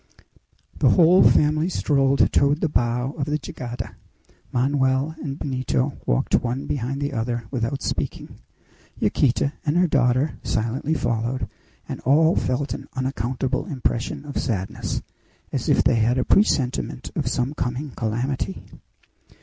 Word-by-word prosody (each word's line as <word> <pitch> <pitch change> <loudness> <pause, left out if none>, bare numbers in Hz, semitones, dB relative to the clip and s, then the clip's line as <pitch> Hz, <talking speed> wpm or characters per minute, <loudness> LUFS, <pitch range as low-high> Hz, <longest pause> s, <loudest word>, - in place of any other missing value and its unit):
The - - +5
whole 180 +1 +6
family 155 +3 +4
strolled 140 -5 +2
toward 140 +2 +3
the - - +2
bow 125 0 0
of 140 - 0
the 150 +1 0
jangada. 125 -4 -7 0.5
Manoel 135 +3 +1
and 140 -2 -4
Benito 130 0 -1
walked - - 0
one 125 +3 -2
behind 135 0 -2
the 145 0 -2
other 120 0 -2
without 130 +1 -2
speaking. - - -4 0.6
Yaquita 140 +2 +2
and 150 +2 +1
her 180 - +5
daughter 135 -1 +2
silently 120 +8 -1
followed, 120 -2 -1 0.4
and - - -5
all 160 +6 +4
felt 130 +3 -1
an - - -7
unaccountable 130 +1 -2
impression 130 +1 -2
of 145 - -3
sadness, 100 -6 -3 0.5
as - - -1
if - - +4
they - - +3
had 115 +3 +2
a 130 - +1
presentiment 135 - +1
of - - -1
some 125 +3 0
coming 130 +1 -3
calamity. 115 - -2
130 Hz, 135 wpm, -23 LUFS, 120-145 Hz, 0.6 s, whole